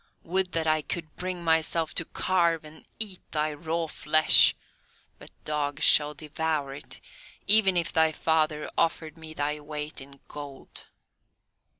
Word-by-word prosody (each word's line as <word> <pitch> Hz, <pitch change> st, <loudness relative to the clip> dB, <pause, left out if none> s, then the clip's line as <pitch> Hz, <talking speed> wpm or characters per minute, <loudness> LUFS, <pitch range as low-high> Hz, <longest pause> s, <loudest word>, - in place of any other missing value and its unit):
would 185 Hz, +1 st, -1 dB
that 165 Hz, -1 st, 0 dB
I 155 Hz, 0 st, +2 dB
could 160 Hz, 0 st, -6 dB
bring 180 Hz, -1 st, -5 dB
myself 160 Hz, 0 st, +1 dB
to 165 Hz, -, -2 dB
carve 170 Hz, -3 st, 0 dB
and 155 Hz, +1 st, -14 dB
eat 205 Hz, -4 st, +2 dB
thy 155 Hz, 0 st, -1 dB
raw 165 Hz, +2 st, -3 dB
flesh, 155 Hz, 0 st, +5 dB, 0.6 s
but -, -, -12 dB
dogs 145 Hz, -2 st, -2 dB
shall 150 Hz, 0 st, +5 dB
devour 155 Hz, -1 st, -3 dB
it, 145 Hz, -, -5 dB, 0.5 s
even 200 Hz, -3 st, +5 dB
if 170 Hz, -1 st, -1 dB
thy 160 Hz, 0 st, +3 dB
father 155 Hz, -1 st, 0 dB
offered 160 Hz, -2 st, 0 dB
me 160 Hz, -1 st, -11 dB
thy 150 Hz, 0 st, -2 dB
weight 150 Hz, 0 st, -6 dB
in 140 Hz, 0 st, -13 dB
gold." 145 Hz, -2 st, -9 dB
155 Hz, 140 wpm, -27 LUFS, 150-165 Hz, 0.6 s, flesh